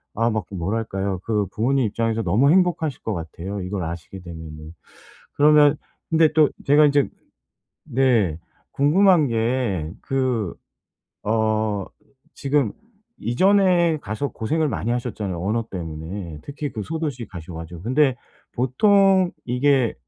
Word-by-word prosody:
아 115 +2 +2
막 110 -1 -2
그 100 - -9
뭐랄까요? 100 0 -2
그 105 -3 0
부모님 130 +5 +1
입장에서 115 +1 -1
너무 110 +10 +3
행복하실 175 -6 +1
것 110 - -2
같아요, 90 +3 -6
이걸 95 0 -3
아시게 85 +3 -7
되면은. 80 -2 -9 0.6
그러면 150 0 +5 0.3
근데 160 -1 +4
또 155 -1 +5 0.2
제가 145 +2 +6
이제 145 -1 +3 0.8
네. 115 -11 +2 0.3
궁금한 160 +2 +4
게 115 -8 -1
그 125 -8 -1 0.7
어 110 -2 0 0.5
지금 140 -5 0 0.5
이전에 180 - +3
가서 110 +3 -3
고생을 155 +8 -1
많이 115 - -2
하셨잖아요, 110 -7 -3
언어 110 +4 -1
때문에 85 0 -6
특히 145 0 -6
그 110 - -4
소도시 145 -3 -4
가셔 90 -2 -9
가지고. 80 +1 -8
근데 130 +3 +2 0.4
보통 190 - +3
이게 125 -1 +2
115 Hz, 265 characters per minute, -22 LUFS, 95-145 Hz, 0.8 s, 제가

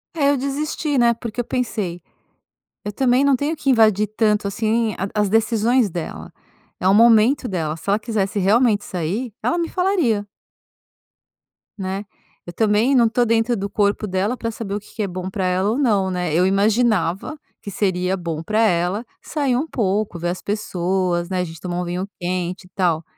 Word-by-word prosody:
É 285 -3 +2
eu 285 - +2
desisti, 285 +2 -2
né? 235 -1 +4
Porque 230 0 -7
eu - - -4
pensei: 210 -9 -3 0.8
"Eu 205 - -4
também 255 +4 +2
não 280 -1 +4
tenho 290 +5 -1
que 280 - -2
invadir 215 -4 +4
tanto 210 -1 +1
assim 220 +1 0
a 195 - -2
as 205 - +1
decisões 225 +2 +2
dela." 170 -2 -6 0.5
É 185 - 0
o 190 - +5
momento 235 +4 +5
dela. 160 -6 -2
Se 165 - -15
ela 205 +2 +3
quisesse 215 -2 -1
realmente 210 +2 +3
sair, 190 +8 -3
ela 345 - +1
me 335 -1 -1
falaria. 340 - +1 1.5
Né. 195 +1 -4 0.4
Eu 175 - -8
também 220 +5 +2
não 235 -2 +5
tô 245 +2 +2
dentro 230 +1 +2
do 200 -1 -3
corpo 205 +1 0
dela 195 +4 -1
para 230 -2 -4
saber 215 -3 -6
o - - -2
que 210 - -18
que 220 - -3
é - - -1
bom 185 0 -5
para 190 -1 -2
ela 185 +2 +1
ou 235 - -1
não, 205 -9 +2
né. 180 -3 -2
Eu 175 +3 +3
imaginava 205 - +1 0.2
que 200 - -7
seria 185 -1 0
bom 165 -3 -4
para 215 +6 0
ela 185 +1 +1 0.2
sair 280 -5 -1
um 265 +5 0
pouco, 205 - -1
ver 175 +1 -1
as 180 - -4
pessoas, 185 -3 -1
né. 185 -1 -1
A - - +1
gente 165 -2 -8
tomar 180 -1 -3
um - - -3
vinho 180 +2 -3
quente, 180 +1 -3
e - - -18
tal. 170 -4 +1
210 Hz, 190 wpm, -21 LUFS, 185-235 Hz, 1.5 s, o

